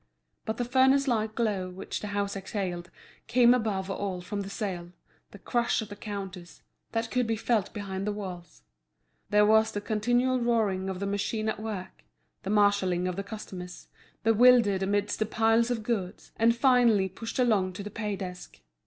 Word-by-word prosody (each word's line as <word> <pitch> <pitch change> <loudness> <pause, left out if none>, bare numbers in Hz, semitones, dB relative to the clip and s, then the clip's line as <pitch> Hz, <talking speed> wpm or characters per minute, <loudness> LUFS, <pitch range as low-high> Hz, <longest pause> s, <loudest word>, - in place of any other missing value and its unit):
But 220 +1 -3
the 245 - -1
furnace 265 +3 +4
like 220 -3 0
glow 205 -6 -1
which 185 +1 -5
the 210 - -6
house 200 0 -2
exhaled 185 -3 -4 0.4
came 240 +1 +5
above 210 -6 -1
all 195 -1 -3
from 200 +3 -4
the 195 - -6
sale, 180 -5 -4 0.4
the - - -12
crush 235 +4 0
at 220 -2 -5
the 205 - -7
counters, 195 -4 -7 0.3
that 225 0 -2
could 250 -2 +1
be 225 - +1
felt 220 -2 0
behind 195 -1 -4
the - - +1
walls. 180 -5 -8 0.7
There 210 0 +5
was 220 +1 +4
the 205 - -3
continual 245 +5 +1
roaring 215 -6 +1
of 190 -1 -4
the 200 - -2
machine 205 +2 -2
at 220 - -3
work, 200 -4 -6 0.4
the 190 - -6
marshalling 200 -4 +2
of 180 - -2
the 200 - -2
customers, 190 -4 -8 0.3
bewildered 225 -3 +5
amidst 200 +1 0
the 215 - 0
piles 225 +2 +2
of 235 -3 -2
goods, 205 -6 -3
and 230 +1 +3
finally 235 -6 +4
pushed 225 +5 -7
along 210 -7 +2
to 200 - -6
the 210 - -7
pay 210 -1 -3
desk. 180 -2 -8
210 Hz, 180 wpm, -28 LUFS, 190-225 Hz, 0.7 s, came